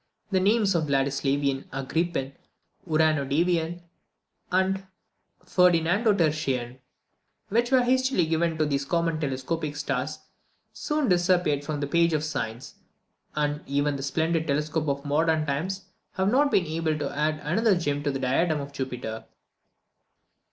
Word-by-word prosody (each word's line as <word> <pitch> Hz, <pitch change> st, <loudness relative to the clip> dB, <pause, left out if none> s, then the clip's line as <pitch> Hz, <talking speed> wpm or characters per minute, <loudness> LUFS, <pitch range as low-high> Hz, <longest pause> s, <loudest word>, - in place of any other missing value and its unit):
The 190 Hz, -, +3 dB
names 205 Hz, +1 st, +3 dB
of 165 Hz, -3 st, +1 dB
Vladislavian, 140 Hz, 0 st, 0 dB
Agrippine, 135 Hz, +1 st, -2 dB, 0.5 s
Uranodavian, 160 Hz, +2 st, +1 dB, 0.7 s
and 190 Hz, +1 st, +1 dB, 0.6 s
Ferdinandotertian, 165 Hz, -, +2 dB, 0.7 s
which 235 Hz, +3 st, +1 dB
were 260 Hz, -1 st, +4 dB
hastily 260 Hz, -6 st, +2 dB
given 165 Hz, 0 st, 0 dB
to 155 Hz, -, +2 dB
these 140 Hz, -1 st, 0 dB
common 165 Hz, +1 st, 0 dB
telescopic 145 Hz, +2 st, -2 dB
stars, 145 Hz, 0 st, -2 dB, 0.6 s
soon 300 Hz, -3 st, -1 dB
disappeared 175 Hz, -5 st, +2 dB
from 150 Hz, -1 st, -3 dB
the -, -, 0 dB
page 170 Hz, +3 st, +2 dB
of 150 Hz, -1 st, 0 dB
science, 135 Hz, -4 st, -4 dB, 0.6 s
and 150 Hz, -1 st, -1 dB
even 145 Hz, +1 st, 0 dB
the 135 Hz, -, -5 dB
splendid 160 Hz, +4 st, 0 dB
telescopes 150 Hz, +1 st, 0 dB
of 140 Hz, +1 st, -2 dB
modern 155 Hz, +2 st, +2 dB
times 185 Hz, +7 st, -3 dB, 0.3 s
have 190 Hz, +1 st, +1 dB
not 285 Hz, +3 st, +4 dB
been 190 Hz, -9 st, +2 dB
able 160 Hz, 0 st, -1 dB
to 150 Hz, -, -4 dB
add 155 Hz, +1 st, +1 dB
another 200 Hz, +7 st, +2 dB
gem 145 Hz, -4 st, -1 dB
to 145 Hz, -, -1 dB
the 135 Hz, -, -1 dB
diadem 150 Hz, +5 st, +1 dB
of 140 Hz, 0 st, -7 dB
Jupiter. 125 Hz, -5 st, -5 dB
155 Hz, 130 wpm, -26 LUFS, 140-175 Hz, 0.7 s, were